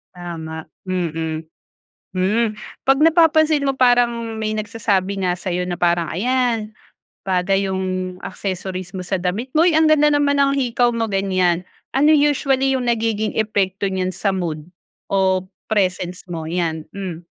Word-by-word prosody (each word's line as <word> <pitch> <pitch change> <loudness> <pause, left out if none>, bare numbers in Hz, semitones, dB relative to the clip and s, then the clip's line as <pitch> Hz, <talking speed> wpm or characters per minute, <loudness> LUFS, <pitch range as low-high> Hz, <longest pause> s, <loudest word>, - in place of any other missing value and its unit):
Tama, 160 -2 -7 0.2
mm. 165 -3 -2 0.7
Hmm, 210 +4 +1 0.3
'pag 270 0 +5
napapansin 315 -3 +4
mo 270 - 0
parang 245 -1 +5 0.3
may 215 0 -1
nagsasabi 205 -3 -1
nga 180 -1 +1
sa'yo 180 -1 -3
na 175 - -2
parang, 170 -1 +1
"Ayan, 230 +2 0 0.5
bagay 195 +1 +1
yung 185 -1 -2
accessories 185 -1 -5
mo 185 - -4
sa 185 +1 -2
damit 190 +8 -2
mo. 330 - +6
Uy! 345 - +4
Ang 315 0 +4
ganda 300 -1 +5
naman 285 -1 +2
ang 275 0 +3
hikaw 245 -3 +1
mo," 225 -1 -1
ganyan. 185 -3 +1 0.3
Ano 295 +3 +5
usually 270 -2 +2
yung 250 - -3
nagiging 225 -2 0
epekto 200 -2 0
niyan 185 -1 -2
sa 195 +3 -1
mood, 170 -4 -3 0.4
o 190 -1 +1 0.2
presence 185 -4 -1
mo? 165 -2 -4
'Yan. 160 -2 -2
Hmm. 180 -4 -6
195 Hz, 145 wpm, -20 LUFS, 180-245 Hz, 0.7 s, mo